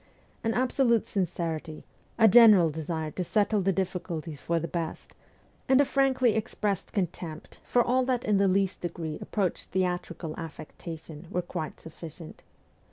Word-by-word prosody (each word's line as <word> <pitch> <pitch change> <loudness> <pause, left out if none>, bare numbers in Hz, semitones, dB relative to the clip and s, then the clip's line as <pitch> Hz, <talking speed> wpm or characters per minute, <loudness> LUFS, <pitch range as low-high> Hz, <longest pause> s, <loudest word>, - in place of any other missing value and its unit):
An 225 0 0
absolute 250 -2 +2
sincerity, 165 -4 -3 0.3
a 225 -1 +7
general 210 -7 +8
desire 160 0 -3
to 180 - -3
settle 210 +3 +2
the 195 +1 +2
difficulties 175 -5 -3
for 170 0 0
the 165 - -3
best, 170 -2 -5 0.6
and 265 0 +6
a 285 - +6
frankly 260 -4 +3
expressed 205 -2 -2
contempt 170 -4 -4
for 245 - +3
all 255 +2 +2
that 250 -2 0
in 210 -1 +3
the 195 0 +4
least 190 0 +1
degree 165 -3 -4
approached 195 -5 -2
theatrical 180 -3 -2
affectation 160 0 -8
were 180 - -1
quite 155 -2 -5
sufficient. 160 0 -10
180 Hz, 145 wpm, -28 LUFS, 165-215 Hz, 0.6 s, general